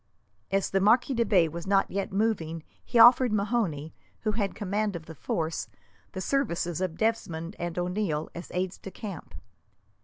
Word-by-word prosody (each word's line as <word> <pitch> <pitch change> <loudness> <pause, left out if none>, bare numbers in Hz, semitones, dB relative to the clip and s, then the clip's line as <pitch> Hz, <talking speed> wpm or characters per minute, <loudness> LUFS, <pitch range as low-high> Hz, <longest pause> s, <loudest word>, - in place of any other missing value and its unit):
As 195 0 0
the 195 - +3
Marquis 240 +6 +4
de 235 -1 +2
Bay 190 -7 +4
was 170 +3 -7
not 195 0 +2
yet 195 0 -2
moving 190 -6 -1 0.2
he - - -1
offered 245 +1 +8
O'Mahony, 200 -8 -1 0.3
who 215 - 0
had 205 -2 0
the - - -23
command 205 0 -1
of 165 -2 -7
the 160 - -9
force, 160 +1 -3 0.4
the 185 - -4
services 175 - -1
of 180 -3 -2
Desmond 185 -6 -1
and 175 0 -4
O'Neil 180 -3 -1
as 175 - -8
aides 185 0 -2
de - - -8
camp. 185 - -8
190 Hz, 175 wpm, -28 LUFS, 170-215 Hz, 0.4 s, offered